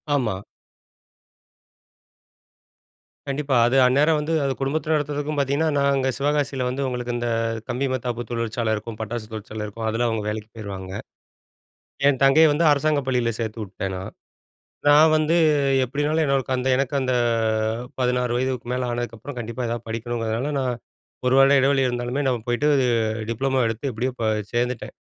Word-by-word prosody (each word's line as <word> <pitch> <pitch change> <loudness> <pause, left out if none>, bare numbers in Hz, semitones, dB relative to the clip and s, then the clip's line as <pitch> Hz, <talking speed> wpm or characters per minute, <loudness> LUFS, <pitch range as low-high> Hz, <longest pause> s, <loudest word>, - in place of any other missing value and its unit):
ஆமா. 110 -9 -1 2.9
கண்டிப்பா! 140 -1 -1
அது 130 +3 +2
அந்நேரம் 145 +5 +4
வந்து, 150 +2 -2
அது 135 -1 0
குடும்பத்தில 155 +3 -1
நடத்துறதுக்கும் 145 0 -2
பார்த்தீங்கன்னா, 140 +3 +1
நாங்க 140 -1 +2
சிவகாசில 140 -2 0
வந்து 130 +2 -3
உங்களுக்கு 125 -1 -3
இந்த, 120 0 -2 0.4
கம்பி 125 +3 -1
மத்தாப்பு 120 -1 -3
தொழிற்சாலை 115 -1 -2
இருக்கும், 110 +1 -7
பட்டாசு 110 0 -4
தொழிற்சாலை 110 0 -6
இருக்கும், 110 +2 -6
அதில 115 +2 0
அவுங்க 110 -2 -1
வேலைக்கு 105 0 -5
போயிருவாங்க. 95 -4 -7 1.2
என் 135 -2 +1
தங்கைய 155 +4 +6
வந்து 155 +3 +1
அரசாங்க 150 +1 +1
பள்ளியில 125 -3 +1
சேர்த்துவுட்டேன் 105 -4 -4
நான். 95 +1 -7 0.8
நான் 150 +2 +7
வந்து 155 +1 +2 0.5
எப்பிடினாலும் 150 +5 0
எனக்கு 135 -1 0
அந்த 125 +1 -1
எனக்கு 135 +1 -1
அந்த 130 -1 0 0.9
16 125 -1 +1
வயதுக்கு 130 -1 -2
மேல 125 0 -1
ஆனதுக்கு 120 -1 -4
அப்புறம் 130 +4 -8
கண்டிப்பா 115 +2 -4
ஏதாவது 115 0 -4
படிக்கணுங்கிறதுனால, 115 +3 -2
நான் 125 -2 -1 0.5
ஒரு 125 - +3
வருட 135 +1 +6
இடைவெளி 135 0 +3
இருந்தாலுமே, 120 +3 -2
நான் 120 -4 -1
போயிட்டு 120 +5 +1 0.6
டிப்ளமோ 130 +3 0
எடுத்து 115 +5 -2
எப்பிடியோ 125 +3 -2
ப - - 0 0.3
சேர்ந்துட்டேன். 120 0 -2
125 Hz, 140 wpm, -23 LUFS, 115-140 Hz, 2.9 s, நான்